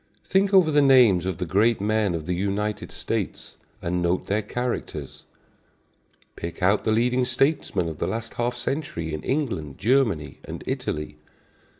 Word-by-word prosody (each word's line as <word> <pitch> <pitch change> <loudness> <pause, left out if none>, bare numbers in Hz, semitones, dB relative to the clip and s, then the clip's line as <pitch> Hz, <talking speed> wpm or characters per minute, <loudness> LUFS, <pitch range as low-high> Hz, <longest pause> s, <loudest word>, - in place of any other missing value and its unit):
Think 195 +1 +2
over 185 -5 +5
the 145 -1 +5
names 120 -10 +5
of 95 -4 -2
the 90 - -2
great 105 +7 +2
men 105 -2 +1
of 80 -2 -5
the 90 - -1
United 100 +3 -2
States, - - -4 0.3
and 90 +1 -1
note 85 +1 0
their 105 +2 0
characters. 105 - -4 1.1
Pick 85 +2 -6
out 100 +3 +3
the 110 - +2
leading 125 +3 +2
statesmen 125 - +1
of 80 -2 -6
the - - -1
last 115 0 -4
half 120 +1 -1
century 120 - -3
in 75 - -3
England, 115 - -2
Germany 110 - +1
and - - -7
Italy. 75 0 -3
105 Hz, 160 wpm, -25 LUFS, 90-125 Hz, 1.1 s, over